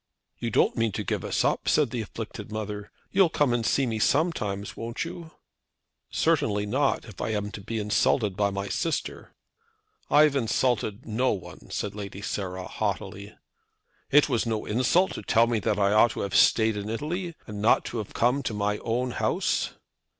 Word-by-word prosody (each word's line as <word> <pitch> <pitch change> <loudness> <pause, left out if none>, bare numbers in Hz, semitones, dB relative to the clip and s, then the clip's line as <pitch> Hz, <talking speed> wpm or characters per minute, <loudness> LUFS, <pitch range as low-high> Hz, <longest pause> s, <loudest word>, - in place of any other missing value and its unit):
"You 120 - -2
don't - - +3
mean 115 -1 +1
to - - -2
give - - -2
us - - 0
up," - - +1
said 145 -6 +3
the 120 - -2
afflicted 110 -1 -7
mother. 105 -1 -5 0.2
"You'll 190 -3 +5
come 145 -5 +2
and 120 -1 0
see 135 +4 +2
me 110 -3 -2
sometimes, 110 - 0
won't 115 +7 -4
you?" 170 -1 -8 0.8
"Certainly 105 -1 +1
not, 135 +6 +1
if 105 -4 -10
I - - -1
am 105 0 -2
to 105 - -8
be 115 +3 -4
insulted 105 0 +1
by 100 0 +2
my 100 0 -3
sister." 165 - -3 0.7
"I 150 - +7
have 150 -2 +3
insulted 115 -3 0
no 120 +4 +1
one," 95 - -9
said 105 - -3
Lady 100 -1 -7
Sarah, 95 -2 -3
haughtily. 100 +2 -4 0.7
"It 145 +1 +6
was 120 -4 0
no 110 -2 -1
insult 130 - +2
to - - -6
tell 115 0 +4
me 115 -2 0
that - - 0
I 100 0 +3
ought 110 +2 +6
to - - -4
have 100 - -3
stayed 110 -2 +4
in 105 +1 -4
Italy, 165 - -3
and 105 -1 -6
not 110 - +3
have 110 -4 -5
come 125 +4 +2
to 115 -5 -3
my 105 0 0
own 125 +2 -1
house!" - - 0
110 Hz, 185 wpm, -27 LUFS, 105-130 Hz, 0.8 s, I